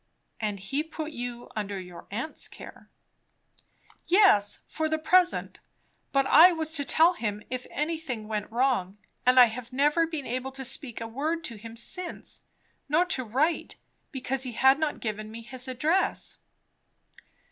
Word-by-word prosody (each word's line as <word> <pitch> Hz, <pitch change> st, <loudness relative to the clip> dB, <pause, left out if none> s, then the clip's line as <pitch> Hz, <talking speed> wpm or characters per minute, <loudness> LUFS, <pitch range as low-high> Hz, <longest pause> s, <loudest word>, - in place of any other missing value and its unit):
"And 210 Hz, -3 st, -2 dB
he 270 Hz, +10 st, -2 dB
put 315 Hz, 0 st, -6 dB
you 245 Hz, -3 st, -6 dB
under 205 Hz, -2 st, -3 dB
your 180 Hz, -2 st, -11 dB
aunt's 240 Hz, +10 st, -3 dB
care." -, -, -12 dB, 1.2 s
"Yes, 345 Hz, -, +4 dB
for 315 Hz, -1 st, -2 dB
the 315 Hz, -, +1 dB
present. 355 Hz, +3 st, +2 dB, 0.5 s
But 275 Hz, -1 st, +3 dB
I 330 Hz, +7 st, +8 dB
was 320 Hz, -2 st, -2 dB
to 290 Hz, -3 st, +1 dB
tell 330 Hz, +5 st, +5 dB
him 210 Hz, -, -4 dB
if 255 Hz, 0 st, -4 dB
anything 300 Hz, -8 st, -3 dB
went 210 Hz, 0 st, -3 dB
wrong; 235 Hz, -6 st, +1 dB, 0.3 s
and 255 Hz, 0 st, +7 dB
I 250 Hz, -, +11 dB
have 235 Hz, +1 st, -6 dB
never 295 Hz, +5 st, +3 dB
been 315 Hz, -4 st, -5 dB
able 255 Hz, +2 st, -3 dB
to 265 Hz, 0 st, -6 dB
speak 260 Hz, -2 st, -1 dB
a 225 Hz, -, -4 dB
word 310 Hz, +8 st, -2 dB
to 235 Hz, -, -5 dB
him 225 Hz, +2 st, -10 dB
since. 355 Hz, +9 st, -5 dB, 0.5 s
Nor 325 Hz, +5 st, +4 dB
to 260 Hz, -, -2 dB
write, 275 Hz, +9 st, 0 dB, 0.4 s
because 265 Hz, -2 st, -2 dB
he 255 Hz, -2 st, -2 dB
had 265 Hz, +4 st, +5 dB
not 310 Hz, -2 st, -1 dB
given 215 Hz, -1 st, -4 dB
me 230 Hz, +1 st, -9 dB
his 255 Hz, +2 st, -4 dB
address." 300 Hz, +9 st, 0 dB
265 Hz, 160 wpm, -27 LUFS, 230-315 Hz, 1.2 s, I